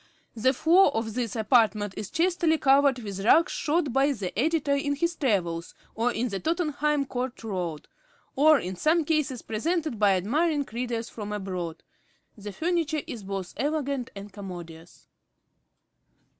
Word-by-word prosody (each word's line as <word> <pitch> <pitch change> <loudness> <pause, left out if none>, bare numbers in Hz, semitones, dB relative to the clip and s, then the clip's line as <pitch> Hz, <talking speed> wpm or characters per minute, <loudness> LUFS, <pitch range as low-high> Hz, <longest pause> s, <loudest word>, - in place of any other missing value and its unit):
The 235 +3 +3
floor 340 +7 +5
of 225 -1 -2
this 235 -2 -3
apartment 215 -3 +2
is 210 - -5
chastely 335 -1 +2
covered 275 -1 +4
with 200 -5 -6
rugs 325 +10 +5
shot 300 -4 0
by 275 +2 +3
the 195 -7 -5
Editor 295 - +1
in 285 0 0
his 340 +4 -1
travels, 180 - -1 0.2
or 235 +2 0
in 240 +1 -1
the 195 -2 -3
Tottenham 300 - 0
Court 255 -1 -4
Road; 180 -8 -4 0.5
or, 310 +2 +6
in 185 -6 -4
some 315 - +2
cases, 300 -5 0
presented 310 - -2
by 205 -2 +5
admiring 285 - +1
readers 235 -1 -3
from 210 -2 -7
abroad. 185 -5 -4 0.5
The 205 -2 -8
furniture 320 - -1
is 230 - -7
both 195 -2 -5
elegant 280 -1 -1
and 200 0 -9
commodious. 175 -4 -10
245 Hz, 145 wpm, -27 LUFS, 205-300 Hz, 0.5 s, or